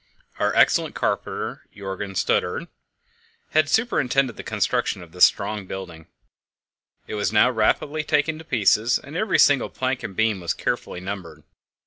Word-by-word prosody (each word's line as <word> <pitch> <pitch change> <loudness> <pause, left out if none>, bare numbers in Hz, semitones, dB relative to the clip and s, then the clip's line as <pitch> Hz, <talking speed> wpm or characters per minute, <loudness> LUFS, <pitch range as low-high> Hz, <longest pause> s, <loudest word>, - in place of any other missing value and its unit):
Our - - +1
excellent - - +3
carpenter - - -3
Jörgen 95 -1 -5
Stubberud 90 - 0 0.8
had 155 -2 +3
superintended 135 - +1
the - - -7
construction - - -1
of 85 - -15
this 90 - +7
strong 105 -1 -2
building. 85 -5 -8 1.0
It - - -8
was 105 -1 -1
now 110 +4 +4
rapidly 140 +7 +1
taken 155 +1 0
to - - -10
pieces, 115 -4 +2
and 140 +3 -11
every 205 +2 +1
single 140 -3 +4
plank 130 0 -2
and 110 -5 -7
beam 110 -2 +1
was 85 -2 -2
carefully 90 - -3
numbered. 90 -5 -7
110 Hz, 145 wpm, -23 LUFS, 95-140 Hz, 1.0 s, this